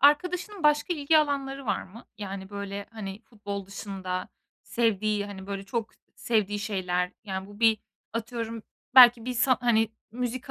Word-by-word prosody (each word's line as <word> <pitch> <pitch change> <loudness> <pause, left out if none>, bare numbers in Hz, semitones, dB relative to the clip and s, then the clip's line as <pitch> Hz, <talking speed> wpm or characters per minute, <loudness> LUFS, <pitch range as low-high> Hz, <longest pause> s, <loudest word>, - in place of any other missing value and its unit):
arkadaşının 360 +7 +3
başka 300 +4 +4
ilgi 310 +1 +4
alanları 275 -3 -1
var 200 - 0
mı? 215 +6 -13
Yani 195 -1 -6
böyle, 200 0 -5
hani, 210 -1 -7
futbol 205 -5 -6
dışında 190 -2 -4 0.3
sevdiği, 215 -3 +1
hani, 190 -1 -8
böyle 200 -1 -4
çok 225 +2 -3 0.3
sevdiği 210 -3 +1
şeyler 180 -4 -1
yani 190 -1 -4
bu 205 +2 -13
bir 225 -2 +5 0.3
atıyorum, 230 -1 -4 0.3
belki 240 -3 +9
bir 255 - -2
sa 255 +1 +4
hani, 225 -2 +3 0.2
müzik 250 +2 -3
220 Hz, 150 wpm, -28 LUFS, 200-250 Hz, 0.3 s, belki